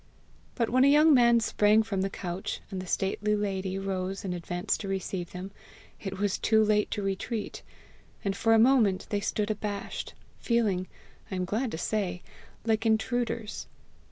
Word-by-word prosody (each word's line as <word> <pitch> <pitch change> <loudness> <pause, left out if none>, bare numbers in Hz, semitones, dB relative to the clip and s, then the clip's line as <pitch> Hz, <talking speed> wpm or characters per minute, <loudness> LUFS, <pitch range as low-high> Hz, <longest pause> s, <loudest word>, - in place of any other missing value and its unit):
But 230 -3 0
when 255 +1 +5
a - - +6
young 300 +2 +6
man 235 -2 +5
sprang 215 0 +4
from 200 -4 -2
a 195 - 0
couch, 180 -1 -4
and 190 -1 -3
the 185 - -9
stately 205 +3 0
lady 195 -2 -2
rose 195 0 -3
and 180 - -2
advanced 175 +2 -2
to 200 - -5
receive 190 -2 -3
them, 185 +2 -7 0.5
it 195 -1 -5
was 205 0 0
too 220 -1 +4
late 210 -1 +2
to 205 - -3
retreat, 195 +3 -3 0.6
and 195 -1 0
for 225 +2 +3
a - - +6
moment 225 -5 +4
they 205 - +1
stood 210 +1 -1
abashed, 205 -1 -4 0.2
feeling, 210 -6 +1 0.4
I - - -4
am 185 0 -1
glad 225 +7 -1
to - - -2
say, 180 -1 -2 0.4
like 225 -1 +1
intruders. 225 0 -1
205 Hz, 170 wpm, -28 LUFS, 190-225 Hz, 0.6 s, a